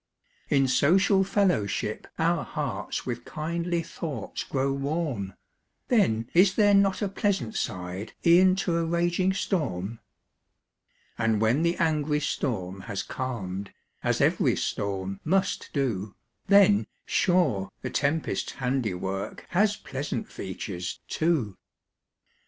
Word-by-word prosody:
In 135 -2 +3
social 190 +9 +4
fellowship, 110 - 0
our 165 0 +2
hearts 125 -9 -4
With 120 -1 -4
kindly 170 +3 -2
thoughts 155 - -5
grow 135 0 0
warm; 140 - -2 0.5
Then 115 - +2
is 185 +3 +5
there 205 -2 +5
not 200 +1 +3
a - - +1
pleasant 195 - -1
side, 90 +4 -4
E'en 185 +2 +6
to 180 -3 0
a 170 - +1
raging 175 +3 +1
storm? 115 - -2 1.2
And 110 -1 +2
when 110 +7 +3
the 170 +1 +1
angry 155 -3 +1
storm 100 -10 -2
has 100 - -2
calm'd, 100 -7 -4 0.3
As - - 0
ev'ry - - +3
storm 95 -1 -3
must 190 +4 0
do, 110 -8 -2 0.3
Then, 200 0 +6 0.2
sure, 165 - +2
the - - -3
tempest's 150 +2 -1
handiwork, 105 -7 -2
Has 205 +3 +3
pleasant 135 -2 -4
features, 90 -2 -5
too. 135 - 0
140 Hz, 115 wpm, -27 LUFS, 105-175 Hz, 1.2 s, E'en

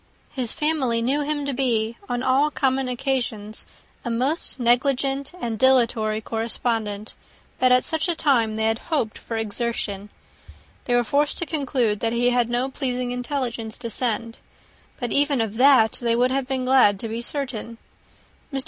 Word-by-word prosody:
His 250 -5 -2
family 295 -7 0
knew 275 +5 +1
him 290 0 -2
to 280 - -2
be, 235 -3 0
on 245 0 -2
all 270 +3 +3
common 265 -2 0
occasions, 240 -4 -3 0.4
a 240 - -4
most 260 +6 +3
negligent 270 +3 +1
and 230 -7 -3
dilatory 230 -4 +3
correspondent; 225 -2 -3 0.5
but 255 0 +4
at 250 0 +5
such 320 +2 -1
a 345 - 0
time 235 -9 +2
they 220 0 -1
had 225 +1 +1
hoped 275 -10 -1
for 225 - -5
exertion. 210 -2 -3 0.8
They 245 - +1
were 245 - +3
forced 285 +5 0
to 345 - 0
conclude, 260 -9 -1
that 225 +2 -1
he 245 +1 +2
had 245 -1 +1
no 245 +2 0
pleasing 250 -3 -2
intelligence 245 -3 -3
to 235 -1 -5
send; 230 -1 -1 0.6
but 245 -3 -3
even 285 -2 +2
of 220 -1 -2
that 255 -4 +6
they 235 -1 +1
would 250 +2 +2
have 270 -1 -1
been 260 -1 -2
glad 255 -7 +4
to 230 - -4
be 225 +1 -4
certain. 240 -4 -4 0.7
Mr. 275 - -2
245 Hz, 165 wpm, -23 LUFS, 225-270 Hz, 0.8 s, that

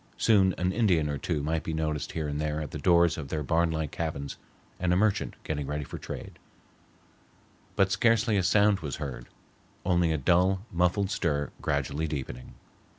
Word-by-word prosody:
Soon 95 -4 +4
an 90 +1 0
Indian 95 -8 +2
or 70 -1 -3
two 75 -5 -2
might 80 +1 0
be 80 - -4
noticed 75 -2 -2
here 80 -2 -2
and 75 +1 -2
there 75 0 -1
at 75 - -5
the 75 - -5
doors 85 0 +4
of 70 - -6
their 75 +1 -2
barnlike 80 0 0
cabins, 70 -4 -4 0.4
and 90 0 +1
a - - +4
merchant 105 +2 +1
getting 75 -3 -3
ready 75 0 -2
for - - -8
trade; - - -8 1.4
but 95 -1 +3
scarcely 115 0 +3
a 100 - +3
sound 100 +2 +4
was 70 -5 -4
heard, 65 -5 -6 0.6
only 85 -2 +3
a 80 - +1
dull, 90 +7 +2
muffled 90 +3 +1
stir 75 -6 -1
gradually 70 +2 -1
deepening. 65 -4 -6
80 Hz, 175 wpm, -28 LUFS, 75-95 Hz, 1.4 s, Soon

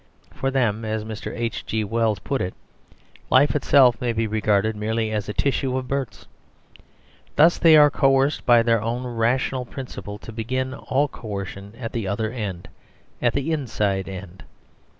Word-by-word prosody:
For 135 - -2
them, 115 -5 0
as 110 0 -3
Mr. 110 -1 -6
H.G. 115 -1 -3
Wells 110 0 0
put 130 +8 -3
it, 90 - -3 0.7
life 140 +4 +4
itself 130 -4 +4
may 120 -2 0
be 115 0 0
regarded 110 0 +1
merely 110 +1 -1
as 105 -1 -2
a - - 0
tissue 135 0 0
of 130 -1 -4
births. 135 -3 -4 1.1
Thus 165 +3 +5
they 160 -2 +7
are 150 -1 +7
coerced 135 0 +2
by 120 -1 +5
their 115 -2 +2
own 120 +3 -2
rational 125 +2 0
principle 120 -5 -8
to 115 - -10
begin 130 +4 -3
all 140 +1 0
coercion 100 -4 -7
at 115 -3 -5
the 115 -4 -2
other 110 +3 -1
end; 100 -8 -5 0.5
at 120 - +2
the 140 +3 -1
inside 105 - -1
end. 95 -1 -9
115 Hz, 160 wpm, -23 LUFS, 105-130 Hz, 1.1 s, they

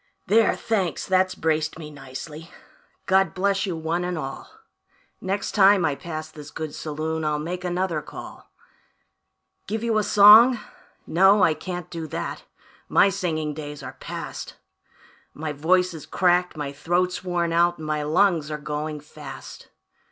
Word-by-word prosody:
"There, 220 +2 +4
thanks, 195 -7 -1
that's 185 0 +2
braced 155 -1 -1
me 155 -2 -9
nicely; 150 +4 -9 0.6
God 190 0 +2
bless 195 +1 +1
you 180 - -2
one 165 +2 -2
and 180 -1 -2
all; 135 -3 -6 0.7
Next 195 +2 -2
time 195 -3 +5
I 150 - +1
pass 155 +1 -6
this 150 -1 -10
good 155 -2 -6
saloon 160 +1 -3
I'll 150 -1 0
make 175 +4 -4
another 175 -3 -1
call. 150 - -11 1.2
Give 220 +2 -3
you 225 -2 +2
a - - 0
song? 215 +5 +8 0.5
No, 190 +4 +5
I 165 - +5
can't 175 +2 -6
do 165 -1 -5
that; 165 +2 -5 0.4
my - - +5
singing 155 -5 -2
days 145 -1 -7
are 130 0 -7
past; - - -7 0.8
My 155 0 -4
voice 180 +5 +2
is 160 - -9
cracked, 180 -2 +2
my 145 -2 -3
throat's 175 +6 -1
worn 175 -2 -1
out, 175 +1 +3
and 155 - -8
my 155 0 -1
lungs 160 0 +2
are 150 - -3
going 150 0 -4
fast. 150 -2 -11
165 Hz, 150 wpm, -24 LUFS, 155-185 Hz, 1.2 s, song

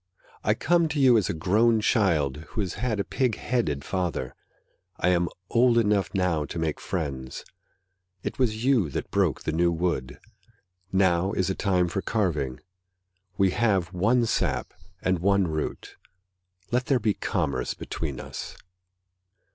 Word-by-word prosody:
I - - +2
come 170 +1 +2
to 150 -1 -2
you 130 -3 +6
as 105 -6 +2
a - - 0
grown 110 +7 +3
child 85 - +2
Who 80 +8 -5
has 95 -3 -2
had 110 -2 -2
a - - +1
pig 125 -1 0
headed 75 - -1
father; 90 -9 -2 0.6
I - - +2
am 90 -1 +2 0.2
old 120 0 +4
enough 105 -3 +2
now 90 -5 +1
to 80 - -6
make 80 -2 -1
friends. 70 -7 -4 0.8
It - - -4
was 115 -2 0
you 125 - +3
that - - -5
broke - - +1
the - - -1
new 85 +2 +2
wood, 80 -7 -2 0.7
Now 95 0 +2
is 95 -1 0
a - - 0
time 90 -3 +1
for 90 +3 -2
carving. 75 - -1 0.8
We 95 -1 +3
have 95 -5 +1
one 115 +7 +3
sap 110 - -1 0.3
and 95 -2 +1
one 100 +1 +3
root 80 -1 -4 0.7
Let 125 +1 0
there 135 -3 +3
be 105 -2 +1
commerce 65 -8 -2
between 70 -6 -5
us. - - -7
95 Hz, 155 wpm, -26 LUFS, 80-110 Hz, 0.8 s, you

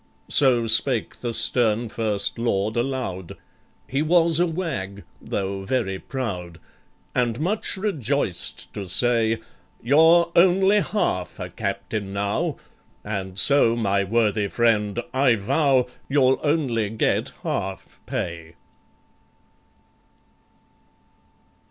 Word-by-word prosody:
So 125 -5 +4
spake 115 +1 +2
the 120 - -4
stern 115 0 +2
First 110 -1 -1
Lord 110 -2 0
aloud— 120 -8 -3 0.5
He 135 +2 -1
was 165 0 +3
a 175 - +3
wag, 130 - -4 0.2
though 95 0 -3
very 95 -4 -2
proud, 90 -11 -5 0.6
And 120 -1 0
much 195 +5 0
rejoiced 140 - -2
to 100 -3 -6
say, 115 +2 +2 0.4
"You're 165 +6 +4
only 190 +3 +5
half 90 - -2
a 90 -1 -6
captain 100 +1 -4
now— 100 0 -1 0.5
And 95 -3 -5
so, 120 0 +4
my 100 -4 +1
worthy 105 0 +1
friend, 110 -1 +1
I 130 -2 +3
vow 130 +5 +2 0.2
You'll 135 -2 +3
only 135 -9 0
get 110 +1 -1
half 95 0 -5
pay!" 85 -1 -5
115 Hz, 100 wpm, -23 LUFS, 100-140 Hz, 0.6 s, only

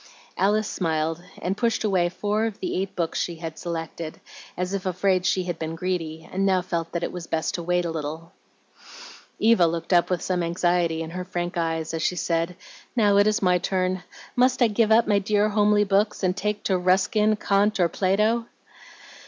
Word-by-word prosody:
Alice 210 +2 +2
smiled, 160 -2 -1 0.2
and 185 +2 0
pushed 230 +1 0
away 185 -5 +2
four 210 +4 -1
of 220 - -7
the - - -3
eight 195 0 -5
books 170 -3 -1
she 170 - -3
had 165 -1 -7
selected, 165 -2 -5 0.4
as 180 +2 -2
if 195 -1 -2
afraid 185 0 +1
she 185 - +1
had 175 -1 -4
been 160 0 -4
greedy, 165 -2 -3
and 190 +1 -1
now 190 -1 +3
felt 170 -2 -3
that 170 -1 -3
it - - -2
was 175 -2 -7
best 160 -1 -1
to 175 - -3
wait 175 +1 0
a 170 - -2
little. 160 +2 -5 1.1
Eva 220 -6 +4
looked 165 +2 -2
up 175 -1 +4
with 180 -2 -1
some 180 -1 0
anxiety 170 -1 +1
in 160 - -7
her 180 +1 -4
frank 175 0 -4
eyes 165 -1 -2
as 165 - -2
she 180 - 0
said, 170 0 -1 0.4
"Now 205 -4 +4
it 205 +1 +5
is 215 -1 +1
my 180 -1 +4
turn. 185 0 -1 0.3
Must 255 +1 +3
I 235 - +4
give 215 +1 +2
up 225 +1 +6
my 205 -1 +3
dear 210 +1 +1
homely 210 0 +3
books, 205 +1 +1
and 180 -1 +2
take 210 +1 -2
to 190 -2 +1
Ruskin, 190 +4 +3
Kant, 205 +1 +1
or 175 - +4
Plato?" 210 +6 +1
185 Hz, 200 wpm, -24 LUFS, 170-205 Hz, 1.1 s, up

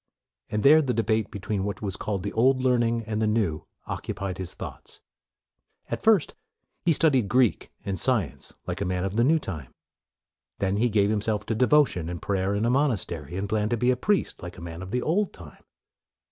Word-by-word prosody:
And 105 0 -1
there 155 +3 +7
the 130 -4 -1
debate 110 -2 +1
between 100 0 -3
what 100 +2 -4
was 100 -2 -2
called 100 -3 -3
the - - -4
old 130 +3 +3
learning 120 -2 +2
and 110 0 -3
the 110 - +2
new 105 -8 0 0.2
occu - - -4
pied 95 -2 -4
his 90 -2 -5
thoughts. - - -9 0.9
At - - -2
first, 220 -7 +3 0.5
he 170 - +3
studied 135 - +3
Greek 125 -2 +2
and 95 -2 -2
science, 85 - 0
like - - -4
a - - 0
man 90 0 -1
of 95 +1 -3
the 115 - +3
new 155 +6 +4
time. 80 - -6 0.8
Then 100 0 0
he 120 +3 +2
gave 105 -1 +2
himself 105 0 0
to 115 - -1
devotion 125 - +3
and 90 -1 -5
prayer 100 +1 -1
in 105 +2 0
a 120 - +2
monastery, 95 - -1
and 95 +2 -2
planned 105 0 0
to 120 - 0
be 125 +3 +3
a - - +2
priest, 200 +11 0
like 90 +1 -8
a - - -9
man 85 0 -7
of 95 - -7
the 125 +4 -1
old 190 +5 0
time. 80 -5 -13
105 Hz, 205 wpm, -26 LUFS, 95-125 Hz, 0.9 s, there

